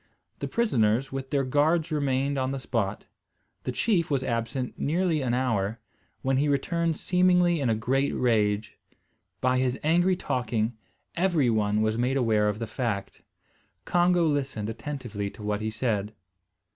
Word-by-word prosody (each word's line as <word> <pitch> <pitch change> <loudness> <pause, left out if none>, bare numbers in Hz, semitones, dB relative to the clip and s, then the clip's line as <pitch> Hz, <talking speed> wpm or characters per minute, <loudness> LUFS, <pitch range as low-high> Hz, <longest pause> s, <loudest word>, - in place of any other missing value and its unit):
The - - -3
prisoners, 130 - +1
with 135 0 -5
their 140 -1 +1
guards 155 +5 +2
remained 140 -1 0
upon 130 -1 0
the 135 - -2
spot. 110 -6 -2 0.6
The - - -1
chief 175 - +1
was 135 -3 0
absent 120 +1 -3
nearly 165 0 +1
an 125 -2 0
hour, 115 -4 0 0.4
when 135 0 +2
he 145 +2 +2
returned 165 +3 0
seemingly 180 -2 +3
in 130 - +1
a 110 - +2
great 135 +5 0
rage. 105 -3 +1 0.6
By 130 0 +2
his 130 0 0
angry 175 +4 +3
talking, 120 -6 -1 0.4
every 165 -8 +2
one 105 -1 +1
was 110 +1 0
made 130 +3 +1
aware 110 -4 +2
of 105 - -2
the 115 - -3
fact. 110 -4 -3 0.6
Congo 175 -1 +3
listened 135 -8 -1
attentively 115 -6 -5
to 105 - -12
what 105 0 -1
he 110 - -1
said. 110 -2 -2
130 Hz, 155 wpm, -27 LUFS, 110-150 Hz, 0.6 s, seemingly